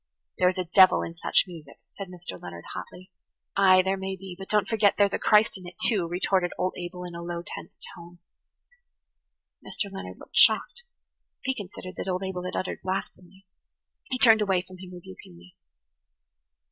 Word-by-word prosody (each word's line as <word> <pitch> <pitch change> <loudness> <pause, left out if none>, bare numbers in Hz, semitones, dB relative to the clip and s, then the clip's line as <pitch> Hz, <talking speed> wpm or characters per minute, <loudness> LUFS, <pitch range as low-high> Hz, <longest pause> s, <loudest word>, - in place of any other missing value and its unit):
"There 180 - +5
is 185 +1 +1
a 185 - 0
devil 185 +2 +6
in 165 - -6
such 165 - +2
music," 165 -6 -12
said 195 - -8
Mr. 175 - -9
Leonard 85 -1 -9
hotly. 180 - -9 0.4
"Ay, 185 -1 +6
there 190 +1 0
may 190 0 -4
be, 190 -1 -9
but 195 +1 -10
don't 210 -3 +2
forget 210 -2 +3
that - - -37
there's 200 -1 +3
a - - 0
Christ 210 -2 +3
in 180 - -11
it, 175 - -11
too," 195 -7 +2
retorted 180 +1 0
old 185 - -1
Abel 180 0 -6
in 175 -1 -7
a 170 - -6
low 170 0 -5
tense - - -9 0.2
tone. 175 +1 -13 1.5
Mr. 200 - -4
Leonard 195 - -7
looked - - -15
shocked; 485 - +4 0.6
he 265 - 0
considered 190 -4 -9
that - - -5
old 185 +1 -1
Abel 185 -1 -4
had 185 - -4
uttered 185 - -3
blasphemy. 190 0 -5 0.6
He 255 - -1
turned 225 -3 +6
away 190 -3 +1
from 185 0 -14
him 185 -1 -10
rebukingly. 90 - -13
185 Hz, 185 wpm, -26 LUFS, 175-195 Hz, 1.5 s, devil